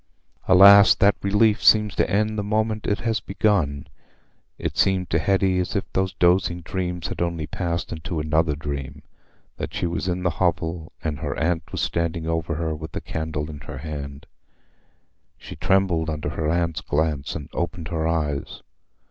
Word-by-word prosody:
Alas! 100 +2 +8
That 100 +1 +4
relief 105 +2 +2
seems 105 -1 +5
to - - 0
end 110 +2 +1
the 105 - -1
moment 110 +1 -1
it 105 - 0
has 115 -1 0
begun. 90 -9 0 0.7
It - - -4
seemed 95 -3 +1
to 80 - +2
Hetty 95 +2 +2
as 90 +3 -2
if 100 - +1
those 95 -1 0
dozen 90 -1 +2
dreams 90 -2 -3
had - - -5
only 85 -2 -1
passed 85 0 -3
into 80 +1 -4
another 75 0 +1
dream—that 70 -2 -8
she - - -1
was 85 +1 -2
in 90 0 -2
the 90 - +1
hovel, 85 -2 -1
and 75 -3 -3
her - - -4
aunt 80 -1 -1
was - - -3
standing 85 -1 -1
over 80 0 -1
her 80 0 -2
with 80 +1 -8
a - - -3
candle 80 -1 -4
in 75 -2 -8
her 75 -2 -8
hand. 70 -1 -7 1.1
She - - -10
trembled 95 -4 +1
under 75 -2 -3
her 80 0 -2
aunt's 85 -1 0
glance, 75 -2 -1
and 75 -2 -6
opened 85 -2 -3
her 80 -2 -1
eyes. 75 -4 -2
85 Hz, 170 wpm, -23 LUFS, 80-95 Hz, 1.1 s, Alas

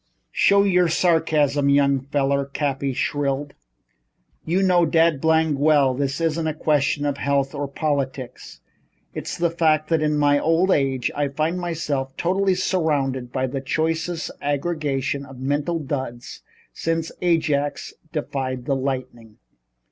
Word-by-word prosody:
"Stow 200 0 +4
your 180 -3 +3
sarcasm, 155 -4 +2
young 140 -1 +3
feller," 140 0 0
Cappy 140 -1 -2
shrilled. 140 +2 -2 0.9
"You 180 +4 +1
know 180 -2 +4
dad 165 -2 +3
blamed 160 -2 +2
well 140 -3 +3
it 140 +1 -1
isn't 165 0 0
a 155 - -2
question 145 -2 +1
of 140 -1 -1
health 140 0 0
or 145 -1 -3
politics. 130 - -4 0.5
It's - - -5
the 170 -1 +1
fact 155 -2 +1
that 165 -2 +2
in 150 -1 +1
my 145 -1 +3
old 165 +5 +2
age 135 -5 +1
I 145 0 0
find 155 +6 -1
myself 150 -6 -3
totally 190 +2 +1
surrounded 145 -9 -1
by 130 0 -1
the 135 +1 -4
choicest 165 +4 -2
aggregation 140 -2 -1
of 135 -1 -12
mental 145 +5 -1
duds 130 -5 -5 0.3
since 165 0 -2
Ajax 155 -5 0 0.2
defied 130 -4 -3
the 140 - 0
lightning." 130 -5 -4
145 Hz, 135 wpm, -22 LUFS, 135-165 Hz, 0.9 s, Stow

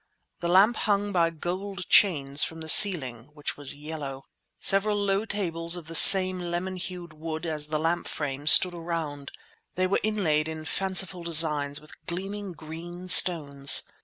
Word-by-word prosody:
The 170 - -6
lamp 200 +6 +1
hung 205 -1 -4
by 170 -3 -1
gold 180 +3 -9
chains 145 -7 +1
from 165 0 -7
the 160 - -8
ceiling, 135 - +3
which 150 -1 -8
was 145 -1 -7
yellow. 145 -3 -11 0.4
Several 205 +2 -1
low 200 +1 -4
tables 170 -5 -4
of 175 -3 -12
the 165 - -12
same 185 +2 +9
lemon 175 +2 -7
hued 180 -2 -10
wood 160 +1 -9
as 155 -2 -3
the 155 0 -5
lamp 165 +3 -5
frame 145 -1 -8
stood 180 +3 +4
around; 165 -4 -8 0.5
they 185 - -3
were 185 - -3
inlaid 170 -8 -3
in 160 -1 -10
fanciful 190 0 -3
designs 150 -4 +1
with 155 - -19
gleaming 195 +2 -9
green 170 +3 -13
stones. 145 -7 +3
170 Hz, 160 wpm, -23 LUFS, 155-185 Hz, 0.5 s, same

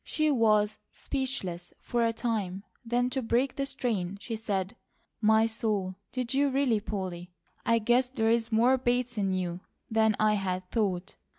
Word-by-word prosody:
She 310 -1 +1
was 215 -4 +3
speechless 195 -11 -4
for 240 -1 0
a 230 - +3
time, 210 -5 -2 0.2
then 245 +1 0
to 265 - -1
break 245 +3 +1
the 275 0 -1
strain 210 -9 -2
she 225 +2 -5
said: 205 -2 -2 0.5
"My 220 0 +5
soul! 215 -4 -1 0.2
Did 250 -1 -2
you 280 +1 +3
really, 265 -5 +2
Polly? 185 -4 -5 0.4
I 230 - +5
guess 240 +3 +2
there 225 -4 +1
is 230 0 +1
more 245 +4 +4
Bates 245 -1 0
in 195 -1 +1
you 180 -2 -2 0.3
than 220 -1 +3
I 215 0 +4
had 185 -2 -2
thought!" 195 -4 -1
225 Hz, 165 wpm, -29 LUFS, 195-245 Hz, 0.5 s, My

